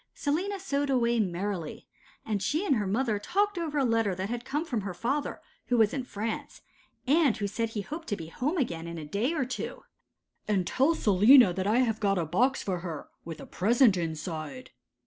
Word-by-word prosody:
Selina 365 +7 -1
sewed 285 -6 -1
away 240 -3 +2
merrily, 185 -3 -3 0.4
and 210 -3 -1
she 305 - 0
and 275 -9 +3
her 205 -2 -1
mother 215 +1 0
talked 400 - 0
over 310 -3 -2
a 275 - +3
letter 225 -5 +1
that 190 +2 -4
had 240 0 -3
come 285 +5 -2
from 240 -9 -2
her 190 -2 -5
father, 270 +9 -2 0.3
who 245 - +2
was 220 -2 +4
in 270 - -2
France, 220 -2 -5 0.4
and 285 -2 +3
who 205 - -2
said 225 +3 -2
he 220 -2 -3
hoped 315 - -7
to 205 - -1
be 165 - -7
home 255 - -2
again 170 - -2
in 170 0 -6
a 155 - -6
day 205 - -1
or 265 - 0
two. 260 - -5 0.6
'And 195 -4 +1
tell 275 - +2
Selina 210 - +6
that 190 +2 -2
I 230 +4 +4
have 225 -3 0
got 195 -2 +1
a 170 - 0
box 250 - +1
for 185 -3 -2
her, 165 -4 -6 0.2
with 165 -1 -7
a - - -8
present 230 +2 +3
inside. 165 - -5
225 Hz, 205 wpm, -28 LUFS, 190-270 Hz, 0.6 s, Selina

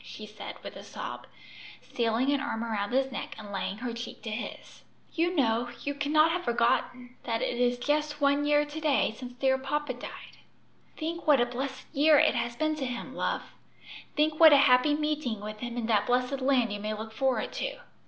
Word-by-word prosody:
she 215 - -9
said 215 0 -9
with - - -8
a - - -9
sob, - - -7 0.6
stealing 235 +3 0
an 285 - +2
arm 265 -5 -3
around 210 -3 -2
his 265 +1 +1
neck - - -5
and 210 -2 -9
laying 195 0 -3
her 240 +1 -4
cheek 235 +1 -7
to 225 - -4
his. 220 +3 -7 0.3
"You 345 +2 +1
know 240 -4 +1
you 285 - -2
cannot 305 +3 +3
have 360 +2 -2
forgotten 245 +1 0
that 230 -1 -1
it 240 - -2
is 245 0 +2
just 295 +3 -1
one 280 0 +3
year 295 0 +3
to 295 +2 -7
day 295 -7 +2
since 250 +1 -8
dear 265 +1 +1
papa 295 +3 -2
died." - - -10 0.6
"Think 335 +1 -4
what 290 -3 +6
a 240 - +4
blessed 260 +2 -5
year 300 +1 +5
it - - +5
has 235 -1 -2
been 310 +3 0
to 275 - -2
him, 245 -1 -5
love; - - -2 0.6
think 300 +1 +1
what 320 -2 +9
a - - +8
happy 275 +1 +5
meeting 300 -7 -1
with 210 +1 -7
him 240 0 -5
in 235 - -2
that 220 -2 +2
blessed 250 +2 +1
land 255 -5 +2
you 205 - -4
may 215 +1 -3
look 220 +1 -7
forward 265 +1 0
to. - - -3
260 Hz, 205 wpm, -29 LUFS, 235-295 Hz, 0.6 s, what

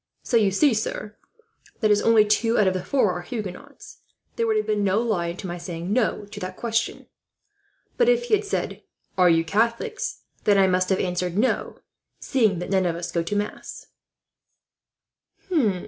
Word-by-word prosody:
So 245 - -1
you 215 -4 +4
see, 255 +8 +3
sir, 215 -1 -3 0.6
that 215 -2 +2
as 205 - +4
only 225 -2 +5
two 225 +2 +2
out 210 - +4
of 185 - +2
the 185 -1 -3
four 255 -8 +2
are 180 0 -4
Huguenots, 250 - -8 0.4
there 460 -1 0
would 435 -1 +2
have 430 - 0
been 210 -1 0
no 200 +2 +2
lie 185 -8 -1
to 185 - -9
my 175 -1 -5
saying 175 +2 -4
'no' 225 -3 0
to 205 0 -10
that 185 -1 -6
question. 230 -1 -2 0.9
But 480 -1 +4
if 485 0 +3
he 480 - -3
had 425 0 +4
said 410 - -3 0.3
'Are 180 -1 +5
you 165 -1 +3
Catholics?' 230 - -1 0.3
I 200 -2 +5
must 185 0 +1
have 190 - +2
answered 180 0 -2
'No,' 250 +5 0 0.4
seeing 220 -8 +1
that 180 +2 -5
none 190 -2 +2
of 170 - -1
us 170 0 -5
go 170 - 0
to 170 +5 -3
mass." 205 +1 -5
205 Hz, 180 wpm, -24 LUFS, 185-235 Hz, 0.9 s, only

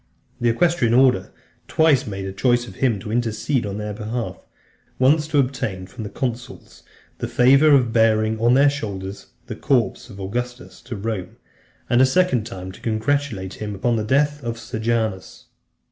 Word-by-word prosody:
The 120 - +2
equestrian 140 -2 +2
(300) 130 +2 +7
order 95 -8 0 0.4
twice 150 -5 +3
made 95 -1 -5
choice 120 +1 +1
of - - -12
him 125 -5 +1
to 105 - -6
intercede 115 +1 -1
on 100 0 -4
their 105 0 -4
behalf; 110 +3 -4 0.6
once 150 +4 +3
to 155 -1 0
obtain 120 -9 -1
from 115 +4 -9
the 105 - -5
consuls 125 0 -6 0.4
the - - -2
favour 135 +5 +5
of 130 -6 +4
bearing 110 -1 +2
on 120 +2 +4
their 140 +2 +5
shoulders 100 -7 -6 0.2
the - - -6
corpse 120 -2 0
of 100 -3 -11
Augustus 120 +6 -5
to 120 - -7
Rome, 100 -3 -5 0.5
and 120 +1 +3
a 130 - +6
second 130 -7 +2
time 95 -5 -7
to - - -15
congratulate 110 -4 -2
him 105 -1 -4
upon 120 +4 0
the 110 - -1
death 145 +5 +1
of 115 -1 -3
Sejanus. 110 -3 -3
115 Hz, 170 wpm, -22 LUFS, 105-130 Hz, 0.6 s, 300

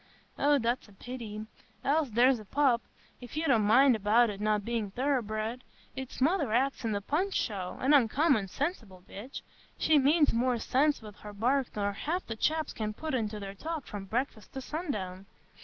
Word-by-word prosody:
"Eh, 290 0 +4
that's 240 -1 -1
a 205 - -18
pity; 215 -1 -7 0.4
else 290 0 +2
there's 245 +3 +4
a 215 - -11
pup,—if 245 +1 -2
you 315 - 0
didn't 260 -8 +3
mind 250 +5 +5
about 220 +2 +3
it 200 0 -8
not 210 -1 +1
being 230 -3 -2
thoroughbred; 235 -1 -1 0.3
its 265 -1 -7
mother 290 - +2
acts 265 +4 +1
in 225 - -1
the 200 -1 -1
Punch 360 - -1
show,—an 205 +7 0
uncommon 270 -3 +3
sensible 220 - -4
bitch; 230 +8 -8 0.3
she 310 -2 +4
means 295 +3 +4
more 245 +1 +1
sense 280 +3 +1
wi' 210 - -8
her 210 0 -9
bark 250 +5 +1
nor 205 -1 -1
half 335 - -3
the 225 - -5
chaps 310 +6 0
can 215 -1 -3
put 315 +3 -4
into 215 -4 -1
their 195 -1 -6
talk 315 +6 -5
from 205 -2 -7
breakfast 225 +1 -3
to 265 - -4
sundown. 210 - -5
240 Hz, 175 wpm, -30 LUFS, 210-280 Hz, 0.4 s, mind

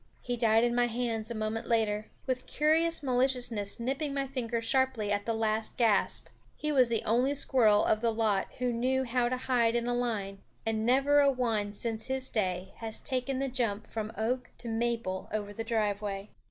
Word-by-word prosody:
He 245 - -2
died 225 -1 +3
in 240 0 +2
my 245 0 +3
hands 230 -2 -2
a 235 - -4
moment 215 +1 -3
later, 215 -2 +1 0.2
with 255 -1 -2
curious 320 +2 +2
maliciousness 245 -6 +1
nipping 275 +4 -2
my 275 -1 0
finger 245 -3 -2
sharply 235 -3 +1
at 205 +1 -1
the 230 - +1
last 220 0 -1
gasp. 225 -5 +2 0.3
He 300 - -1
was 255 -4 +4
the 230 -1 0
only 250 +6 +2
squirrel 230 -7 +4
of 215 0 +2
the 230 -1 +2
lot 215 -3 +1
who 250 -1 0
knew 260 +3 +1
how 245 -1 +1
to 255 - -1
hide 240 -3 +1
in 235 0 0
a 245 - 0
line; 215 -5 -2 0.3
and 220 0 0
never 275 +3 +4
a 280 -1 +5
one 225 -6 0
since 225 +1 -3
his 265 0 -2
day 185 -3 -1
has 225 -1 -4
taken 260 0 -2
the 270 +1 -1
jump 230 -5 -1
from 220 -1 -5
oak 245 +3 -1
to 240 - -8
maple 225 -4 -2
over 205 -1 -3
the 225 - -4
driveway. 210 -3 -2
235 Hz, 195 wpm, -30 LUFS, 215-255 Hz, 0.3 s, a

